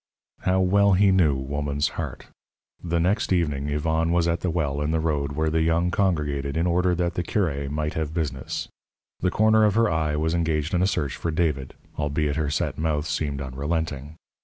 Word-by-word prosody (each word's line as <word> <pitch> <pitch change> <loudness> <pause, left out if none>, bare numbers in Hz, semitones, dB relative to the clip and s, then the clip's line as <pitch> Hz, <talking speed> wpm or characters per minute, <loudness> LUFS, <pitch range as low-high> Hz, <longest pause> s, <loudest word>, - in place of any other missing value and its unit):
How 95 0 +1
well 100 +2 +4
he 95 +1 +4
knew 85 -7 +4
woman's 70 +2 -1
heart! - - -6 0.6
The 85 -1 0
next 95 +6 +1
evening 75 -6 0
Yvonne 80 +3 0
was 85 -1 +2
at 85 0 +1
the 90 - -1
well 75 -4 -1
in 75 - -1
the 80 0 +1
road 75 -3 -1
where 80 +2 0
the 80 +1 +1
young 85 +2 +2
congregated 75 -7 0
in 85 - +1
order 90 +1 +2
that 85 0 -1
the 90 - -1
curé 80 -7 -1
might 75 +1 -2
have 80 -2 -2
business. 75 -6 -3 0.5
The 90 - +1
corner 110 +3 +4
of 105 -1 +3
her 115 -3 +3
eye 80 -2 0
was 80 +2 0
engaged 80 -1 0
in 90 - +2
a 95 - +3
search 75 -8 -1
for 85 - -3
David, 75 -5 -1 0.2
albeit 75 0 0
her 75 -2 -1
set 75 - -2
mouth 80 -2 0
seemed 70 -4 -2
unrelenting. 70 +2 -3
80 Hz, 195 wpm, -25 LUFS, 75-90 Hz, 0.6 s, well